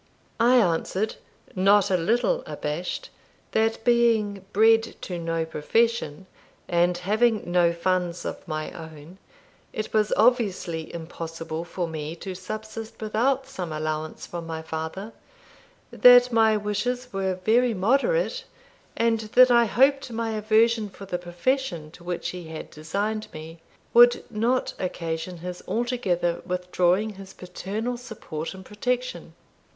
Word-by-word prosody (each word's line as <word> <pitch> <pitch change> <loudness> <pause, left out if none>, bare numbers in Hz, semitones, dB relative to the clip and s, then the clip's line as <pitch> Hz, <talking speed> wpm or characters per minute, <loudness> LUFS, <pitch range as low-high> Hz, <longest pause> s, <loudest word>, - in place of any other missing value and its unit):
I 240 +2 +5
answered, 190 0 +1 0.4
not 195 +1 +4
a - - +4
little 240 - +1
abashed, 155 +5 -4 0.4
"That 225 0 +1
being 225 -5 +2
bred 225 +2 +4
to 180 -2 -4
no 165 -1 -1
profession, 190 +1 0 0.4
and 175 +1 +2
having 215 +5 +1
no 175 -1 +4
funds 180 0 -1
of - - -6
my 155 -1 -3
own, 160 +1 -11 0.5
it 215 - -5
was 215 -1 +2
obviously 205 -8 +1
impossible 165 -1 -6
for 175 0 -4
me 155 0 -5
to 185 +2 -6
subsist 215 +4 -7
without 245 +5 0
some 185 -11 -6
allowance 155 0 -4
from 170 -1 -7
my 160 -1 -5
father; 160 +7 -5 0.8
that 245 0 +7
my 220 -1 +4
wishes 245 +4 -2
were 190 -1 -1
very 225 +5 +2
moderate; 475 - +1 0.5
and 230 -1 +2 0.2
that 255 0 +8
I 235 -1 +6
hoped 270 +4 +3
my 225 0 -2
aversion 220 0 +2
for 195 +1 -11
the 180 -2 -3
profession 175 - -2
to 170 - -15
which 175 0 -3
he 180 -2 -7
had 160 0 -8
designed 200 +8 -3
me, 160 +1 -9 0.3
would 240 0 +7
not 235 +4 0
occasion 170 -1 -4
his 180 0 -5
altogether 200 -8 0
withdrawing 180 +3 +1
his 190 0 -11
paternal 205 +7 -4
support 210 -9 -7
and 190 0 -11
protection." 250 +5 -3
195 Hz, 130 wpm, -25 LUFS, 170-230 Hz, 0.8 s, that